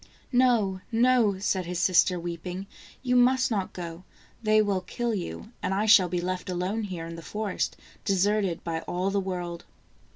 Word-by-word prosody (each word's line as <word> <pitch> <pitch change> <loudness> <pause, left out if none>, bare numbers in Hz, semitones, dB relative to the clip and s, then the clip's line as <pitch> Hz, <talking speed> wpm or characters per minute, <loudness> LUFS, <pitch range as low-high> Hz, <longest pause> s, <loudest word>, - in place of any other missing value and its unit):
"No, 235 -7 +3
no," 235 -3 +3
said 190 -2 -1
his 180 0 -3
sister 180 +1 +3
weeping; 175 +2 -5 0.4
"you 250 -1 +1
must 255 +1 +4
not 195 -4 -1
go. 170 0 -7 0.4
They 215 -1 +4
will 200 -3 +1
kill 235 +5 -2
you, 85 - -5
and 190 +1 -1
I 205 +2 +1
shall 200 -4 +6
be 175 +1 -1
left 185 +1 -3
alone 185 +5 -1
here 175 -4 -5
in 165 0 -7
the - - -7
forest, 210 +2 -3 0.3
deserted 195 -2 +1
by 165 -1 -2
all 185 +2 -1
the 200 - +1
world." 175 -3 -4
190 Hz, 170 wpm, -27 LUFS, 175-215 Hz, 0.4 s, shall